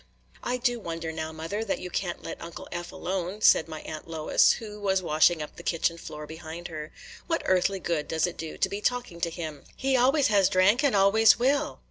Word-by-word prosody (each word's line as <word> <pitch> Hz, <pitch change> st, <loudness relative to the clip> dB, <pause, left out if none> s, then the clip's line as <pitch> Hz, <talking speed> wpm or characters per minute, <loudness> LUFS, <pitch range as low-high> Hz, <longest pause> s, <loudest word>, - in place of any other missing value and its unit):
"I 250 Hz, -, -1 dB
do 245 Hz, -1 st, 0 dB
wonder 165 Hz, -4 st, -4 dB
now, 160 Hz, 0 st, -4 dB
mother, 165 Hz, +7 st, -4 dB
that 210 Hz, -, -1 dB
you 180 Hz, -, -7 dB
can't 175 Hz, -2 st, -3 dB
let -, -, -7 dB
Uncle 170 Hz, 0 st, -8 dB
Eph 175 Hz, 0 st, -5 dB
alone," 190 Hz, +2 st, -4 dB
said 160 Hz, -, +5 dB
my 155 Hz, -1 st, -7 dB
Aunt 155 Hz, 0 st, -8 dB
Lois, 160 Hz, -2 st, +3 dB
who 210 Hz, -2 st, -8 dB
was 195 Hz, -2 st, +1 dB
washing 155 Hz, 0 st, +3 dB
up 150 Hz, -, -10 dB
the -, -, -8 dB
kitchen 170 Hz, 0 st, 0 dB
floor 150 Hz, -1 st, -8 dB
behind 160 Hz, +2 st, -8 dB
her. 155 Hz, -2 st, -7 dB, 0.4 s
"What 330 Hz, -1 st, -1 dB
earthly 185 Hz, +1 st, +2 dB
good 165 Hz, -4 st, -2 dB
does 160 Hz, -1 st, +1 dB
it 175 Hz, -, -4 dB
do 160 Hz, -1 st, -7 dB
to -, -, +2 dB
be 200 Hz, +2 st, -5 dB
talking 245 Hz, -8 st, -2 dB
to 170 Hz, -, +1 dB
him? 160 Hz, -3 st, -6 dB
He 270 Hz, 0 st, 0 dB
always 265 Hz, +3 st, +4 dB
has 200 Hz, -3 st, +4 dB
drank, 200 Hz, +8 st, +4 dB
and 280 Hz, -6 st, +3 dB
always 200 Hz, +3 st, +6 dB
will." 275 Hz, +4 st, +1 dB
180 Hz, 215 wpm, -27 LUFS, 160-210 Hz, 0.4 s, always